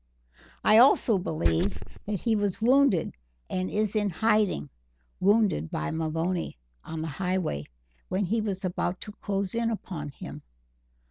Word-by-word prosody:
I 215 +1 +7
also 240 -4 +5
believe 85 - 0 0.3
that 205 -4 -2
he 230 -2 +2
was 205 -1 0
wounded 250 - +3 0.4
and 185 0 -1
is 215 0 0
in 210 -1 +2
hiding 205 - +1 0.5
wounded 200 - +3
by 75 - -2
Maloney, 165 - -2 0.3
on 160 -1 -5
the - - -3
Highway, 180 - -2 0.4
when 195 +2 0
he 220 +5 0
was 195 -3 -3
about 180 0 -2
to 210 - -7
close 195 -2 -1
in 230 0 +1
upon 175 -9 -5
him." 140 - -9
190 Hz, 140 wpm, -27 LUFS, 165-215 Hz, 0.5 s, I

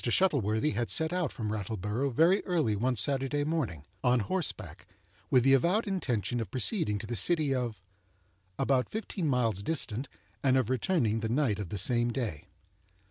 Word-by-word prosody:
Shuttleworthy 125 - +2
had 120 -4 -2
set 160 +1 +2
out 180 -5 0
from 110 -3 -4
Rattleborough 110 +5 -2
very 165 - +3
early 160 - +1
one 125 +5 0
Saturday 135 +5 +1
morning, 140 - -2 0.2
on 125 -2 +3
horseback, 180 - -4 0.4
with 125 -2 +4
the 135 +1 +5
avowed 175 - +3
intention 125 - -1
of 115 - -4
proceeding 130 - 0
to 105 - -6
the 120 +2 -4
city 150 - +2
of 125 -4 -2 0.4
——, 95 +1 -39
about 130 -2 +1
fifteen 210 -5 -3
miles 115 -7 +1
distant, 130 -1 -2 0.3
and 130 -1 +3
of 130 -2 0
returning 125 - +1
the 110 0 -3
night 120 -5 +1
of 100 -5 -5
the 105 - -4
same 120 +3 +1
day. 105 - -4
125 Hz, 170 wpm, -30 LUFS, 110-150 Hz, 0.4 s, the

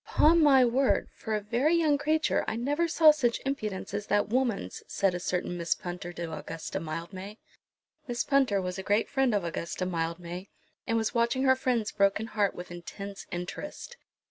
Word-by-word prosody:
"Upon 330 +2 +5
my 270 -4 +6
word, 255 +3 +2
for 220 -1 -3
a 210 - -1
very 245 +10 +1
young 310 -4 +3
creature 310 +1 +1
I - - -1
never 290 +8 0
saw 320 -1 +7
such 245 -6 0
impudence 215 -8 -3
as 205 0 -3
that 205 0 +1
woman's," 235 - -1
said 195 -2 +1
a 180 - -3
certain 180 0 -2
Miss 170 0 +1
Punter 175 0 -6
to 170 -2 -5
Augusta 165 +1 -5
Mildmay. 185 +6 -6 0.7
Miss 240 -1 -1
Punter 265 -8 +2
was 180 0 -4
a - - -5
great 205 +3 +2
friend 265 -5 +1
of 200 - 0
Augusta 170 +2 -3
Mildmay, 170 +2 -4 0.4
and 230 - +1
was 220 -1 0
watching 235 +3 +1
her 260 -1 +5
friend's 245 -5 0
broken 200 +2 +2
heart 210 -3 0
with 180 0 -8
intense 195 +3 -8
interest. 180 - -6
210 Hz, 180 wpm, -29 LUFS, 180-265 Hz, 0.7 s, saw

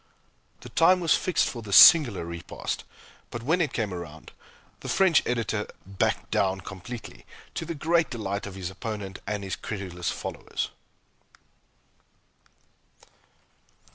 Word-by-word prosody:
The - - -10
time 180 +3 +4
was 170 -3 +3
fixed 185 - +1
for 120 - -5
this 100 -3 -1
singular 130 - +8
repast, 85 0 -5 0.4
but 120 -1 -6
when 165 +7 +2
it 150 -5 0
came 105 -7 -2
round, 80 -3 -8 0.5
the - - -7
French 185 -5 +4
Editor 110 -3 -1 0.2
"backed 95 0 -1
down" 95 0 +1
completely, 100 +6 -9 0.3
to - - -4
the 170 - -4
great 165 +3 +2
delight 100 -5 -4
of 100 - -8
his 95 -1 -5
opponent 100 -1 -6
and 105 -1 -2
his 95 - -3
credulous 90 -4 -5
followers. - - -4
105 Hz, 130 wpm, -27 LUFS, 95-145 Hz, 0.5 s, singular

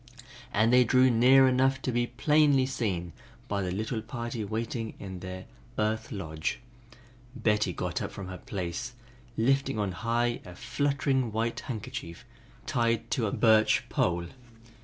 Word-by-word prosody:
As 110 +2 +3
they 125 0 +7
drew 130 +2 +4
near 130 +3 +6
enough 130 +1 +3
to 130 - 0
be 120 0 +1
plainly 145 +1 +3
seen 95 -10 -2 0.3
by 100 -1 -1
the 90 - -2
little 110 +4 -2
party 115 0 -5
waiting 110 +2 -3
in 95 -2 -7
their 95 0 -7 0.3
"earth 110 +4 -1
lodge," 80 -7 -3 0.8
Betty 105 -5 +1
got - - -3
up - - -4
from 100 - -7
her 95 -1 -7
place, 100 +1 -4 0.4
lifting 135 +1 +2
on 100 -3 0
high 120 +5 -1
a 90 -1 -11
fluttering 135 +1 0
white 115 +2 -1
handkerchief 120 -8 -6 0.4
tied 115 -1 0
to 115 -4 +1
a - - -2
birch 110 -2 +4
pole. 85 0 0
115 Hz, 145 wpm, -29 LUFS, 100-125 Hz, 0.8 s, they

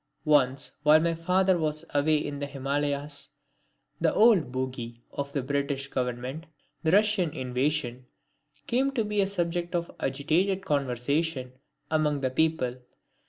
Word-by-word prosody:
Once 140 -3 +3
while 150 +1 +6
my 165 +1 +1
father 180 +2 +2
was 155 0 -1
away 150 +2 +3
in 145 -1 -4
the 145 - -3
Himalayas, 145 +1 -2 0.7
that - - +2
old 210 - +5
bogey 125 -2 -4
of 140 0 -4
the 140 -2 -2
British 140 0 -1
Government, 125 +5 -3 0.3
the 160 - +1
Russian 205 -1 +3
invasion, 130 -1 -1 0.6
came 260 +3 +1
to 230 -5 0
be 210 -1 +1
a 195 - +2
subject 175 -2 -2
of 170 0 -2
agitated 165 +8 0
conversation 140 0 -1 0.4
among 150 -2 +1
the 130 -1 0
people. 130 -4 0
145 Hz, 135 wpm, -28 LUFS, 135-170 Hz, 0.7 s, while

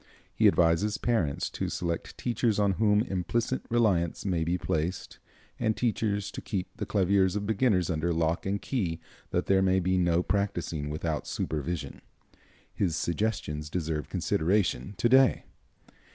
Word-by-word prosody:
He - - +4
advises 90 +5 +3
parents 95 -13 0
to - - -3
select 85 -1 -3
teachers 120 -2 0
on 100 -1 +3
whom 105 -1 +4
implicit 115 +4 -1
reliance 100 -10 +1
may 90 -4 0
be 85 +2 0
placed, 80 +1 -3 0.4
and 110 -2 0
teachers 105 -4 -1
to - - -7
keep 95 -3 -4
the - - -4
claviers 95 -1 +2
of 105 0 -2
beginners 105 -4 +2
under 85 +1 0
lock 80 +2 0
and 100 +1 0
key 90 -12 -2 0.3
that - - -1
there 95 -1 +3
may 95 0 +3
be 95 +1 +1
no 85 0 +2
practicing 90 -7 -2
without 75 +1 -3
supervision. 75 -1 -3 0.7
His 90 -5 0
suggestions 85 -5 -2
deserve 80 -3 -3
consideration 90 -3 0
to - - +2
day. 130 +1 +5
95 Hz, 145 wpm, -28 LUFS, 85-105 Hz, 0.7 s, day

